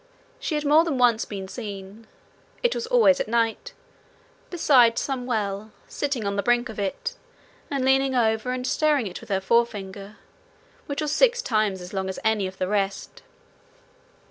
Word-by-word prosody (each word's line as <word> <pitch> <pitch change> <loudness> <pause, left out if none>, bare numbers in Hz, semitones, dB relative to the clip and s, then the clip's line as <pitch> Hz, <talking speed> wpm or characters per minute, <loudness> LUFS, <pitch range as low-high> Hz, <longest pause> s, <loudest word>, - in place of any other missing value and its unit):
She 315 - -2
had 300 0 -2
more 300 +3 +6
than 320 -6 -2
once 240 -3 +3
been 195 -2 -6
seen 200 0 -8 0.6
it 485 - +3
was 465 - -4
always 465 - +4
at - - -1
night 230 - -1 0.8
beside 255 -9 +4
some 260 -3 -2
well, 215 -2 -2 0.2
sitting 275 -7 -3
on 200 0 -1
the 200 - +1
brink 240 +2 +1
of 220 - -7
it, 200 - -3 0.6
and 275 -2 -1
leaning 265 0 +3
over 220 -1 +1
and 255 0 -3
stirring 295 -3 +2
it 185 -3 -6
with - - -14
her 195 -1 +1
forefinger, 205 -1 -1 0.7
which 285 +2 -3
was 300 - -1
six 485 +7 +3
times 215 -5 0
as 180 +2 -10
long 190 -1 -2
as 190 - -5
any 215 -3 +2
of 185 0 -10
the 185 - -1
rest. 195 -1 -2
230 Hz, 170 wpm, -24 LUFS, 200-275 Hz, 0.8 s, more